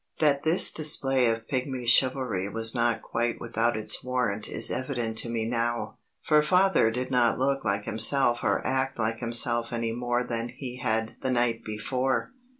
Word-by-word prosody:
That 145 -3 +2
this 165 +5 +5
display 135 -5 +2
of 115 0 -3
pigmy 130 -1 -3
chivalry 120 -6 +2
was 115 +1 -2
not 120 -2 -1
quite 120 0 -2
without 115 -1 -1
its 110 - +1
warrant 125 -5 -2
is - - +1
evident 120 -4 -3
to 120 - -2
me 115 -1 -2
now, 120 0 -3 0.2
for 150 0 +3
Father 180 -5 +3
did 125 +3 -4
not 120 -2 +2
look 135 +1 -1
like 100 -1 -1
himself 120 +3 +3
or 100 -3 0
act 130 0 -1
like 110 0 -2
himself 120 0 +2
any 115 -1 -2
more 120 +1 -2
than 115 -1 -4
he 125 0 -8
had 110 -2 -2
the 130 - -2
night 120 -2 0
before. 125 - -2
120 Hz, 170 wpm, -26 LUFS, 115-130 Hz, 0.2 s, this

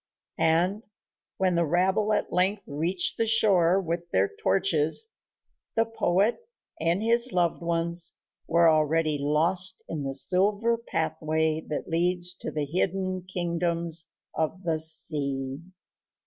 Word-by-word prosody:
And 180 +7 +2 0.5
when 185 -1 +1
the 170 0 +2
rabble 190 +6 +1
at 210 - -1
length 195 +3 +1
reached 170 +6 -1
the 225 - 0
shore 195 -5 +4
with 170 -1 -4
their - - +2
torches, 190 - +1 0.6
the 225 - +3
poet 210 -1 +1 0.4
and 170 +5 0
his 235 +2 +2
loved 175 -1 0
ones 170 0 -1 0.3
were 170 0 +4
already 155 -1 +2
lost 170 +6 +1
in 160 -3 -4
the 135 0 -3
silver 200 +9 +2
pathway 160 -6 -1
that 150 - -4
leads 175 +1 0
to - - -5
the 150 -1 -3
hidden 185 +3 -2
kingdoms 170 -2 -1 0.2
of 160 +4 -2
the 165 -2 0
sea. 145 -4 +1
170 Hz, 125 wpm, -26 LUFS, 160-190 Hz, 0.6 s, shore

